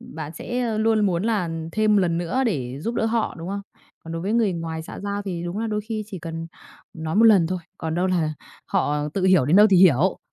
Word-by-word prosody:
bạn 155 -1 -8
sẽ 240 +2 -2
luôn 220 -1 +3
muốn 175 -1 0
là 210 -7 0 0.2
thêm 215 -1 +3
lần 170 -3 +2
nữa 175 +10 -1
để 135 - -2
giúp 230 +7 -3
đỡ 225 - 0
họ, 225 0 0
đúng 165 +2 -6
không? 200 +1 -3 0.4
Còn 165 - -9
đối 165 +1 -4
với 200 - -1
người 225 -4 +2
ngoài 165 -1 -4
xã - - -9
giao 200 0 -3
thì 175 -4 -4
đúng 175 +3 -4
là 225 - -1
đôi 210 -1 -1
khi 215 0 -4
chỉ 195 -4 -7
cần 165 0 -6 0.5
nói 160 +1 -4
một 225 - +6
lần 195 -7 +6
thôi, 185 +1 -2 0.2
còn 160 -1 -3
đâu 180 +2 +1
là 170 -4 0 0.3
họ 150 0 0
tự 190 -2 0
hiểu 185 -7 +5
đến 165 +6 +4
đâu 210 +1 +8
thì 190 - +6
hiểu. 175 0 +4
185 Hz, 245 wpm, -23 LUFS, 165-215 Hz, 0.5 s, đâu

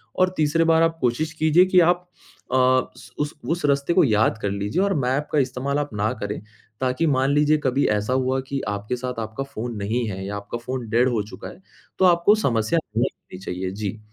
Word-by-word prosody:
और 185 0 +3
तीसरी 155 +2 +2
बार 165 0 +4
आप 165 0 +1
कोशिश 135 +6 0
कीजिए 160 +3 +4
कि 185 -1 +4
आप 175 +1 +2 0.5
अ, - - +3
उस 130 0 +1
उस 150 0 -1 0.2
उस 170 -2 -1
रास्ते 140 +3 +1
को 185 - +5
याद 110 -3 +2
कर 100 - -1
लीजिए 100 - -1
और 200 -1 +1
मैप 135 +4 0
का 150 - +2
इस्तेमाल 135 +2 -1
आप 145 - -2
ना 105 +2 0
करें, 105 0 -4 0.4
ताकि 130 +6 +1
मान 135 0 +2
लीजिए 150 +1 +3
कभी 130 +2 +2
ऐसा 105 +3 0
हुआ 130 0 +1
कि 140 -1 -3
आपके 105 +4 -3
साथ 125 -1 -4
आपका 110 +4 -4
फ़ोन 120 -3 -6
नहीं 110 +4 -1
है 95 0 -5
या 100 +1 -4
आपका 100 +3 -6
फ़ोन 125 -1 -5
डेड 120 +3 +3
हो 115 -3 0
चुका 95 - -9
है, 190 - -14 0.4
तो 190 - +5
आपको 175 +4 +5
समस्या 120 - +1 0.2
नहीं 125 - +2
होनी 90 - -14
चाहिए, 95 0 -4
जी। 105 +1 -5
130 Hz, 215 wpm, -23 LUFS, 110-155 Hz, 0.5 s, को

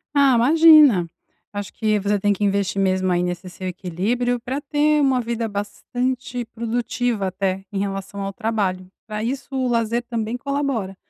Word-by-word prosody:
Ah, 275 -3 +5
imagina, 290 - +6 0.4
acho 205 -1 -6
que 215 -2 +1
você 205 0 0
tem 205 +1 +2
que 205 - -4
investir 200 -1 0
mesmo 185 -1 +1
aí 175 0 +1
nesse 180 +1 -4
seu 185 +1 -7
equilíbrio, 200 +8 -1
para 260 +5 -4
ter 300 +1 +2
uma 265 -3 +3
vida 230 -1 -2
bastante 245 +4 -3
produtiva 230 -2 -2
até, 190 0 -2
em 195 - -2
relação 195 0 -4
ao 195 0 -3
trabalho, 200 -5 -2 0.2
pra 215 0 -4
isso 265 +3 -3
o 260 -1 0
lazer 235 0 0
também 235 0 -3
colabora. 275 -8 -2
220 Hz, 160 wpm, -22 LUFS, 195-245 Hz, 0.4 s, imagina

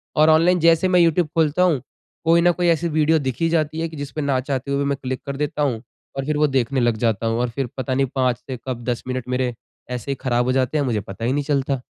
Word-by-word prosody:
और 155 +1 +5
ऑनलाइन 170 +3 +4
जैसे 165 +2 +4
मैं 180 -1 +4
यूट्यूब 170 0 +3
खोलता 160 +2 +2
हूँ, 160 -9 +2 0.4
कोई 165 +1 +5
न 175 +1 +5
कोई 175 0 -1
ऐसी 170 0 +2
वीडियो 155 +1 +2
दिख 130 -4 -2
ही 165 - +3
जाती 155 -1 0
है 165 - -1
कि 160 - -10
जिसपे 145 +1 -5
न 140 -2 +1
चाहते 140 -1 -2
हुए 140 - +1
भी 140 - 0
मैं 140 - 0
क्लिक 130 0 -3
कर 140 - -4
देता 150 0 -2
हूँ 120 -6 0 0.4
और 135 - -2
फिर 150 0 -1
वो 150 - +3
देखने 135 -1 0
लग 120 -2 +2
जाता 115 -1 0
हूँ 115 +1 0
और 125 0 0
फिर 135 +1 -3
पता 130 0 -2
नहीं 135 +1 +2
5 125 -2 +1
से 130 0 -7
कब 120 -2 -4
10 120 - -2
मिनट 130 -1 -3
मेरे 125 -1 0 0.4
ऐसे 125 +2 -4
ही - - -1
ख़राब 120 -2 +1
हो 130 - +1
जाते 130 +3 +1
हैं 145 - +1
मुझे 115 -5 0
पता 100 +3 -7
ही 125 - +1
नहीं 145 0 0
चलता। 135 -2 -1
140 Hz, 275 wpm, -21 LUFS, 125-155 Hz, 0.4 s, और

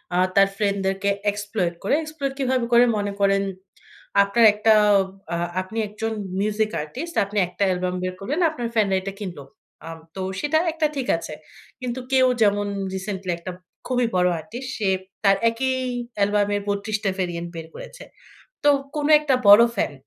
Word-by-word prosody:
আ - - +2 0.2
তার 195 0 +6
ফ্রেন্ডদেরকে 200 -1 0 0.2
exploit 205 -4 -2
করে, 205 - +2
exploit 295 -3 -4
কিভাবে 255 -2 +1
করে? 235 - +7
মনে 205 0 -2
করেন, 195 0 +3 0.8
আপনার 210 +3 +3
একটা 215 +1 +3 0.6
আ - - 0 0.3
আপনি 185 +5 -9
একজন 220 +2 -4 0.3
music 215 +1 0
artist, 270 - -7
আপনি 205 +1 -7
একটা 180 +3 -3
অ্যালবাম 180 0 -1
বের 185 - -2
করলেন, 275 - -3
আপনার 245 -7 -4
ফ্যানরা 205 -3 +2
এটা 195 +1 -6
কিনল। 185 -6 -6 0.5
আ - - -6 0.3
তো 190 - -4 0.2
সেটা 295 +5 +1 0.2
একটা 315 -1 +1
ঠিক 265 -3 -3
আছে। 155 - -7 0.5
কিন্তু 250 0 -3
কেউ 260 -1 +5
যেমন 205 -1 +3 0.3
রিসেন্টলি 190 -1 -4
একটা 170 +2 -7 0.4
খুবই 250 -2 +1
বড় 180 0 +3
আর্টিস্ট, 235 +10 -8
সে 210 - -1 0.4
তার 195 -1 +5
একই 260 +3 -1 0.4
অ্যালবামের 205 0 +1
৩২ 205 +2 -1
টা 195 - +2
variant 175 -2 -3
বের 165 -1 -7
করেছে। - - -10 0.6
তো 290 - +6 0.3
কোন 295 -1 0
একটা 295 -3 +1
বড় 205 +3 +10
ফ্যান। 150 - 0
205 Hz, 160 wpm, -23 LUFS, 195-245 Hz, 0.8 s, বড়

